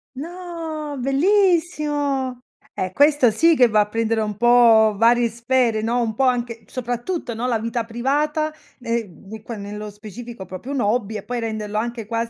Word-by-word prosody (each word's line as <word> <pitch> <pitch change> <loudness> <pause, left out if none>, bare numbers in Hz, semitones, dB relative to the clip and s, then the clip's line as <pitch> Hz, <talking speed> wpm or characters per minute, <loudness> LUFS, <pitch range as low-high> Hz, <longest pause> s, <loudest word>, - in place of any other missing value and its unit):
No, 325 -2 -6
bellissimo. 290 -5 +1 0.3
Eh, 185 - -3
questo 285 -1 +4
sì 330 +7 +4
che 250 -4 +6
va 215 -1 +3
a 205 - 0
prendere 225 +1 0
un 210 -2 -2
po' 230 -2 +5
varie 235 +2 +4
sfere, 235 -1 +1
no, 240 +2 0
un 220 -2 -2
po' 270 - +1
anche, 235 -3 -1
soprattutto, 245 +4 -4
no, 230 +3 -3
la 230 -3 +1
vita 230 +1 -2
privata, 295 +6 -1 0.3
ne 235 -1 -2
mhmm, 205 +4 -12
qua 230 +2 -7
nello 210 +1 -7
specifico 215 +1 -9
proprio 185 +10 -8
un 270 -3 -1
hobby 215 0 0
e 205 - -5
poi 245 0 -4
renderlo 215 -2 -4
anche 235 0 -3
quas 230 0 -2
240 Hz, 170 wpm, -21 LUFS, 220-275 Hz, 0.3 s, che